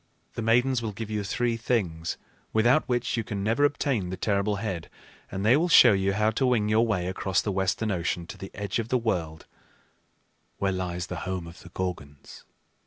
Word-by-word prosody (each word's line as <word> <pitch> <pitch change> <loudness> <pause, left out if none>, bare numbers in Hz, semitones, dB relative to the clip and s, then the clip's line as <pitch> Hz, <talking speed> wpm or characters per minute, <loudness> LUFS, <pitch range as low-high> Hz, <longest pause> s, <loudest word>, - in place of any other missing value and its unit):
The - - -4
Maidens 120 +3 +3
will 110 -2 -4
give 110 +2 -6
you 105 -1 -1
three 115 +4 -1
things, 90 -9 -1 0.4
without 120 +7 +3
which 120 0 0
you 115 - 0
can 100 -3 -4
never 115 +7 +1
obtain 135 -9 0
the 95 - -4
terrible 100 0 0
head; 100 -5 -4 0.4
and 95 +2 -3
they 115 +4 +6
will 170 +4 +2
show 125 -7 +8
you 95 0 +1
how 105 +2 +2
to 120 +5 0
wing 110 -4 +2
your 110 +2 +3
way 90 -6 0
across 95 0 0
the 105 - -1
western 95 +3 0
ocean 85 -1 -2
to - - -9
the 95 - -7
edge 100 +1 -2
of 115 0 -3
the 130 - +3
world 85 -9 -2 1.1
where 100 -1 0
lies 90 -2 -3
the 90 -1 -6
home 90 -2 -3
of 85 +1 -11
the 85 - -12
Gorgons." 85 -6 -6
105 Hz, 200 wpm, -27 LUFS, 90-115 Hz, 1.1 s, show